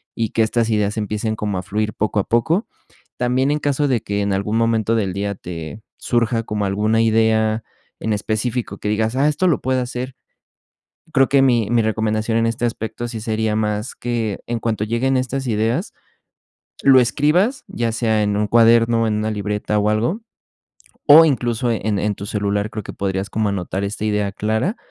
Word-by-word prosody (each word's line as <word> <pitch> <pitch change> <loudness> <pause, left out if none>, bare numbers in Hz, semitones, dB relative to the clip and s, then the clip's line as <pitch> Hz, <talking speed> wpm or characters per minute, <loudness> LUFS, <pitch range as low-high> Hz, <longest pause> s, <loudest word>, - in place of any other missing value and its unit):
y 115 -2 -1
que 115 - +2
estas 115 +1 0
ideas 105 -1 0
empiecen 110 +1 -2
como 105 -3 -3
a 90 - -4
fluir 105 +3 -2
poco 105 0 -1
a 100 - 0
poco. 160 - +1 0.5
También 130 +3 +1
en 150 - 0
caso 145 0 0
de 125 -5 +1
que 100 0 -2
en 100 -1 0
algún 105 +3 -1
momento 115 -1 +1
del 100 -5 0
día 100 +1 -2
te 85 +2 -8 0.2
surja 115 -1 0
como 105 -2 -2
alguna 105 +3 +1
idea 110 0 +2 0.4
en 110 - -1
específico 110 +3 -2
que 105 - -3
digas: 110 +2 0
"Ah, 140 +3 +3
esto 150 +5 +1
lo 170 - +1
puedo 130 0 0
hacer" 125 +1 -4 1.0
Creo 135 -1 +4
que 140 0 +4
mi 120 -5 +3
mi 120 -1 +3
recomendación 110 0 0
en 115 - +2
este 115 +1 -1
aspecto 115 +1 -4
sí 115 -2 -6
sería 110 -1 -1
más 105 +2 -2
que, 115 -4 -3
en 120 0 -2
cuanto 110 -2 -1
lleguen 120 +4 0
estas 130 +1 -2
ideas, 115 - -1 0.9
lo 135 -1 +7
escribas, 155 - +1
ya 115 -1 -2
sea 110 -2 +1
en 105 -1 0
un 105 +1 +1
cuaderno, 115 +1 +4
en 110 - 0
una 105 +1 -1
libreta 105 0 -2
o 105 0 +1
algo, 115 - 0 0.9
o 160 +2 +9
incluso 120 -4 0
en 110 -2 -1
en 105 0 -1
tu 100 - -7
celular 100 0 -1
creo 110 -1 -6
que - - -8
podrías 95 0 -2
como 110 +1 0
anotar 95 0 -3
esta 105 +1 -3
idea 105 -1 0
clara 110 - -1
110 Hz, 190 wpm, -20 LUFS, 105-120 Hz, 1.0 s, o